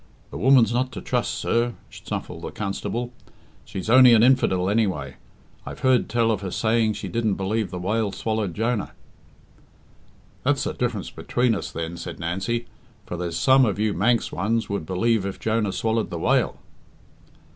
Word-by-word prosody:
"The - - -6
woman's 125 -4 +5
not 130 +1 0
to 95 - -6
trust, - - -1
sir," 120 0 0 0.2
snuffled - - -6
the - - -5
constable. 115 +4 -4 0.5
"She's 95 - -6
only 125 0 +8
an 110 - +5
infidel, 105 -8 +3
anyway. 95 - 0 0.5
I've - - -9
heard 130 -2 +3
tell 115 -1 +2
of 105 -3 -1
her 95 - -4
saying 110 +2 +1
she 100 - -6
didn't 110 +2 0
believe 105 +2 -1
the 90 - -6
whale 105 +3 -1
swallowed 110 -5 -2
Jonah." 115 -1 -1 1.5
"That's - - +1
the - - -2
diff'rance - - -3
between 125 -1 0
us, 100 - -4
then," 85 +1 -5
said - - -7
Nancy; 95 +8 -2 0.4
"for - - -5
there's 85 -1 -3
some 130 0 +5
of 105 -6 +1
you 105 0 +1
Manx 115 +6 +1
ones 110 +5 -1
would 100 -6 -3
believe 110 +3 +1
if 100 -1 -5
Jonah 110 -2 0
swallowed 110 +2 -1
the 85 - -4
whale." - - +1
110 Hz, 170 wpm, -24 LUFS, 95-115 Hz, 1.5 s, only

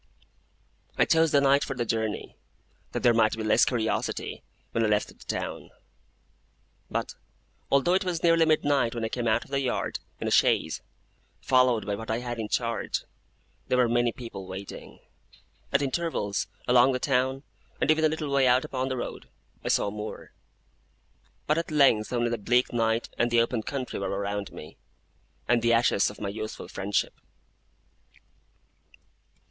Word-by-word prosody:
I - - +5
chose 160 -1 +3
the 140 - +5
night 140 +1 +4
for 135 - -4
the 120 -1 -1
journey, 110 -2 -2 0.6
that - - -4
there 120 - +6
might 110 -1 +3
be 110 - -3
less 110 - +4
curiosity 120 -6 -2 0.3
when 115 - 0
I - - +3
left 105 0 +1
the - - -13
town. - - -5 1.2
But, - - -3 0.6
although 140 +6 +3
it 190 +2 +2
was 175 -3 -3
nearly 165 -1 +5
midnight 145 -6 +2
when 115 -1 -2
I - - -2
came 120 0 -2
out 110 +1 +2
of - - -19
the 140 - +1
yard 130 -2 -2 0.2
in - - -3
a - - -1
chaise, - - +2 0.6
followed 125 -5 +3
by 105 - -2
what 110 +2 -6
I 110 - +1
had 120 -1 -5
in 110 -1 -4
charge, 115 0 -1 0.6
there 125 - +1
were 125 -1 +4
many 120 0 +2
people 110 -6 -8
waiting. 95 +1 -9 0.7
At 140 - +2
intervals, 135 -8 -1 0.2
along 125 +1 +5
the 125 - -1
town, 130 0 0 0.4
and - - +3
even 155 0 +2
a 155 - +5
little 155 -2 -3
way 135 -1 +4
out 125 +1 +4
upon 130 0 -2
the 130 - -2
road, 120 - -6 0.3
I - - -5
saw 100 - +2
more: 105 +1 -7 1.1
but 150 +2 +2
at 165 - -4
length 135 -8 +3
only 120 -1 0
the 120 - -2
bleak 125 +5 +1
night 115 0 0
and 120 - +3
the 120 0 +3
open 115 0 +1
country 130 +2 -4
were 100 - -2
around 100 0 -3
me, 75 - -11 0.7
and 120 -1 +3
the 115 0 +3
ashes 115 -3 +3
of 105 - -11
my 100 - -3
youthful 110 +1 -6
friendship. 100 +1 -1
120 Hz, 170 wpm, -27 LUFS, 110-135 Hz, 1.2 s, there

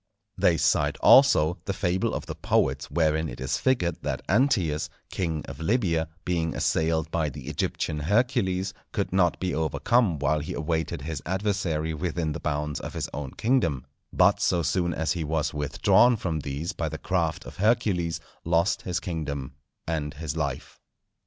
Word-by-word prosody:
They 85 -2 +3
cite 75 -1 +2
also 90 - +6
the 100 - -1
fable 95 -1 0
of - - -4
the - - -5
poets 65 +1 0
wherein 80 -1 +1
it - - -8
is 65 +1 -1
figured 105 -10 +1
that - - -3
Antæus, 95 - +2 0.2
king 80 -4 -2
of - - -9
Libya, 85 -4 +1 0.2
being 85 -2 -1
assailed 80 0 0
by 80 -3 0
the 70 -1 -9
Egyptian 75 +1 -2
Hercules, 95 - +1 0.2
could 100 -4 -2
not 90 -3 +2
be 90 -1 -1
overcome 85 - +1
while 75 +2 +1
he 75 - -5
awaited 80 -3 -2
his 75 -2 -4
adversary 95 -4 -1
within 80 0 -2
the - - -4
bounds 75 0 -2
of - - -7
his - - -3
own 70 -2 -5
kingdom; 85 - +1 0.3
but - - +4
so 85 -1 +2
soon 85 +2 +1
as 80 -1 -1
he 85 -2 -1
was 75 0 -1
withdrawn 75 +11 +4
from 85 -6 -2
these 75 +4 -4
by 80 - -2
the 80 - -5
craft 85 -2 -1
of - - -10
Hercules, 95 -6 +1 0.2
lost 85 +2 +2
his 90 -2 -2
kingdom 75 -7 -4 0.3
and 75 -3 -3
his 80 0 -4
life. 70 -5 -4
80 Hz, 165 wpm, -26 LUFS, 75-95 Hz, 0.3 s, also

